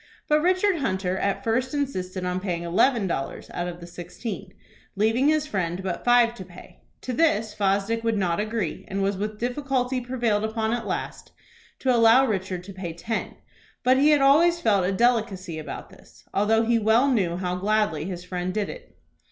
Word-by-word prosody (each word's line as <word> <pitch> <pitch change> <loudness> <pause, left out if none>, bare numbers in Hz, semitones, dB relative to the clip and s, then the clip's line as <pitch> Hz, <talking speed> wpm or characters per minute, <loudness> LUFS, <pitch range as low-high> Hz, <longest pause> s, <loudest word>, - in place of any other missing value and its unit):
But 300 0 +3
Richard 370 +2 +2
Hunter 190 - -1
at 200 0 -1
first 250 +5 0
insisted 185 -10 -3
on 180 0 -1
paying 175 -3 -3
eleven 215 +6 +2
dollars 150 -7 -4
out 175 - -2
of 175 -1 -6
the 170 - -9
sixteen, 180 +3 -7 0.4
leaving 225 +7 +2
his 305 -1 +2
friend 185 - -2
but 185 -2 -3
five 240 -1 +4
to 190 - -7
pay. 180 0 -15 0.2
To 255 - -4
this 225 -7 +2
Fosdick 205 +3 0
would 225 -2 +1
not 175 -3 0
agree, 215 -5 -2
and 195 0 -2
was 200 0 0
with 210 +2 -4
difficulty 255 +1 -1
prevailed 240 -4 0
upon 220 0 -1
at 240 -1 -3
last - - -5 0.5
to 260 -1 +2
allow 230 +3 +6
Richard 190 -5 -2
to 195 +2 -10
pay 180 -3 -6
ten; 215 +7 -4 0.5
but 255 +1 +4
he 290 +3 +5
had 295 -2 +4
always 330 +6 +5
felt 200 - +2
a - - +1
delicacy 195 -6 0
about 155 - -8
this, - - -19
although 220 +3 +3
he 230 0 +2
well 225 +5 +4
knew 190 -10 +1
how 180 -1 -2
gladly 200 -5 0
his 180 -1 -5
friend 180 0 -4
did 210 -2 -1
it. - - -11
215 Hz, 185 wpm, -25 LUFS, 185-245 Hz, 0.5 s, allow